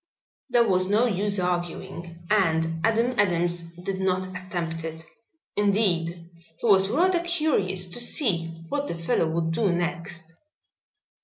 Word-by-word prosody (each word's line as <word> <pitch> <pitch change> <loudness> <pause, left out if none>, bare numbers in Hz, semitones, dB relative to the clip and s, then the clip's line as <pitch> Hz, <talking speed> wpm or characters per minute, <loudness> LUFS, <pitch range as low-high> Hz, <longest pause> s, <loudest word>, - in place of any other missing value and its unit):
There 240 -2 +4
was 185 -2 +2
no 210 +5 +3
use 205 -2 +1
arguing 175 -1 -4
and 165 -5 +1
Adam 230 +3 +2
Adams 175 -2 +2 0.2
did 190 0 -3
not 185 -1 +1
attempt 175 -3 -4
it. 160 0 -7 0.5
Indeed, 180 -5 +1 0.3
he 235 - -2
was 195 -2 +5
rather 355 - +3
curious 305 - 0
to 240 - -1
see 210 - +2 0.2
what 285 0 -2
the - - -3
fellow 165 -1 0
would 165 0 -1
do 190 +4 +1
next. 175 -1 -2
180 Hz, 135 wpm, -25 LUFS, 170-210 Hz, 0.5 s, was